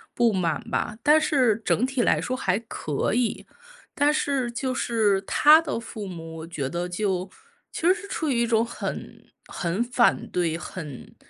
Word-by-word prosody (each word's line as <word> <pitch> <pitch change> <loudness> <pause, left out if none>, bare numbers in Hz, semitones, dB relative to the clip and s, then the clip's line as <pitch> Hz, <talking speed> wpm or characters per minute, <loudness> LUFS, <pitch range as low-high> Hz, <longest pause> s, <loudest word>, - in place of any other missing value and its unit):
不 235 -2 +3
满 170 -4 0
吧， 215 - -2
但 300 +1 +6
是 260 - +2
整 245 - +2
体 265 -1 -1
来 - - +2
说 255 - -2
还 190 -7 0
可 155 -9 -3
以。 240 0 0 0.5
但 290 +1 +4
是 275 -5 0
就 255 +2 -2
是 220 -6 +2
他 300 +9 +6
的 295 -7 -3
父 220 -3 -7
母， 165 -3 -8
我 160 - -7
觉 145 -6 -4
得 175 +2 -3
就 185 0 -2 0.4
其 - - -6
实 355 +3 +5
是 405 0 -9
处 320 -5 -2
于 240 -3 +1
一 235 - +1
种 225 -1 +3
很 235 - -6 0.2
很 180 +6 -2
反 240 0 +2
对， 170 -3 0
很 160 -6 -8
225 Hz, 190 characters per minute, -25 LUFS, 180-255 Hz, 0.5 s, 但